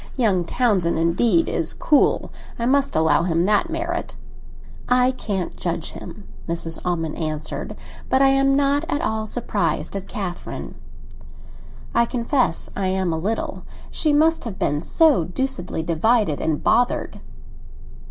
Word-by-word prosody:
Young 195 -8 +2
Townsend 190 -6 +1
indeed 185 - +2
is - - -1
cool; 295 -3 +2 0.3
I 235 - -2
must 275 +2 +2
allow 160 0 +3
him 170 0 +1
that 210 - +2
merit." 340 +2 -3 0.7
"I 250 +1 +4
can't 200 -8 -4
judge - - -3
him," - - -10 0.2
Mrs. 165 -1 -1
Almond 165 -3 -2
answered; 155 -2 -4 0.3
"but 260 - +3
I 270 0 +5
am 275 0 +3
not 285 +1 +2
at 290 - 0
all 220 0 -1
surprised 215 -3 -2
at 195 -1 -5
Catherine." 185 -4 -5 1.2
"I 235 0 +3
confess 245 - 0
I 195 -2 -1
am 185 -2 0
a - - -1
little; 215 +7 -3 0.3
she 310 - +1
must 320 +2 +3
have 215 -5 -5
been 145 +1 0
so 295 - +3
deucedly 180 -3 -2
divided 170 0 +1
and 155 -2 -1
bothered." 245 +2 +1
215 Hz, 140 wpm, -22 LUFS, 170-265 Hz, 1.2 s, I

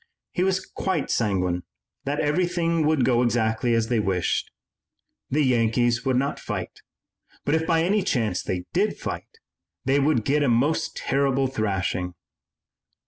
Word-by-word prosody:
He 180 - -2
was 190 0 +1
quite 185 -6 -2
sanguine 90 -5 0 0.4
that 145 +2 -1
everything 165 0 +1
would 155 -5 +3
go 120 -2 +3
exactly 115 0 +1
as 115 -1 +1
they 120 -2 +2
wished. 95 -4 0 0.8
The 150 +3 +2
Yankees 120 -1 +2
would 130 -1 +2
not 140 +2 -1
fight, - - -5 0.6
but, 145 - +1
if 160 0 +1
by 165 -1 +3
any 200 +4 +2
chance 115 - 0
they 90 -1 -3
did 200 +4 +1
fight, 455 - -6 0.5
they 135 +2 +3
would 140 -5 +2
get 145 +2 +2
a 140 - +2
most 145 +8 +1
terrible 135 -1 +1
thrashing. 95 -7 -2
130 Hz, 145 wpm, -25 LUFS, 110-160 Hz, 0.8 s, would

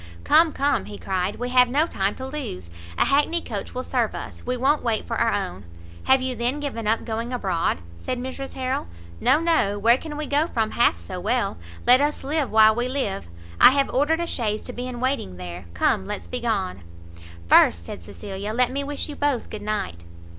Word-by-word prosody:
"Come, 325 0 +5
come," 285 0 0
he 205 - -8
cried, 190 +1 -2
"we 245 +1 -4
have 250 -1 +5
no 290 +5 +3
time 195 - -1
to 260 - -6
lose. 175 - -6 0.3
A - - +3
hackney 295 +5 +2
coach 210 -10 -6
will 255 - -2
serve 240 -5 0
us; - - -7
we 250 0 -2
won't 275 +4 +2
wait 230 -3 -1
for 230 - -3
our 230 0 +2
own." 100 - -3 0.4
"Have 265 0 +4
you 260 -1 -2
then 245 +5 -1
given 245 -7 -4
up 225 +1 +1
going 230 +1 -3
abroad?" 185 - -1 0.2
said 250 - -3
Mrs 260 +2 -6
Harrel. 255 - -2 0.3
"No, 280 - +4
no; 320 -12 +2
where 230 +5 +4
can 300 -2 -7
we 305 - -3
go 295 +3 +1
from 225 -7 -1
half 235 - +3
so 85 0 -7
well? - - 0 0.3
let 255 +2 +7
us 295 +1 0
live 290 0 0
while 220 0 +6
we 240 +2 -1
live! 255 - -2 0.3
I - - +10
have 275 -1 +1
ordered 305 +5 +2
a - - 0
chaise 215 -9 -2
to 250 - -7
be 245 +1 -5
in 245 -1 -6
waiting 255 - -1
there. 90 0 -7
Come, 190 - +1
let's 210 0 -5
be 250 - -3
gone." 205 - -2 0.7
"First," 85 0 +5
said 85 - -8
Cecilia, 200 - -6
"let 250 0 +2
me 280 +2 -2
wish 285 0 -3
you 295 - -7
both 285 -4 -1
good 215 - -6
night." 205 - -3
245 Hz, 210 wpm, -24 LUFS, 205-275 Hz, 0.7 s, I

